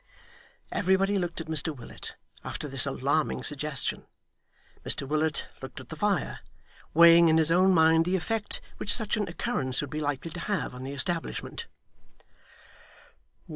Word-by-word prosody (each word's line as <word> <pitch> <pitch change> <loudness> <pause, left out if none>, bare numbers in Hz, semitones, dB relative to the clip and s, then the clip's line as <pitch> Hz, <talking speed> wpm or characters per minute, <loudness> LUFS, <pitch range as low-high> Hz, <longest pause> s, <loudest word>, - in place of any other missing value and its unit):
Everybody 195 +1 +2
looked 175 -2 -3
at - - -7
Mr 160 -1 +2
Willet, 120 - -9 0.3
after - - -5
this 135 0 +3
alarming 140 +3 0
suggestion. 145 -2 -2 0.8
Mr 140 - -1
Willet 155 +1 0
looked - - -8
at - - -12
the - - -6
fire, - - -1 0.6
weighing 170 0 +8
in 160 - +4
his 160 0 +4
own 185 +3 +5
mind 160 -1 +5
the 180 +2 +1
effect 210 +4 -2 0.2
which 205 - -1
such 215 -2 +3
an 210 -2 -1
occurrence 165 - -2
would 145 - -4
be 155 - -3
likely 145 +2 -3
to 175 - -7
have 195 -5 -2
on 125 +1 -8
the 135 - -5
establishment. 165 +4 -4
160 Hz, 150 wpm, -28 LUFS, 145-185 Hz, 0.8 s, weighing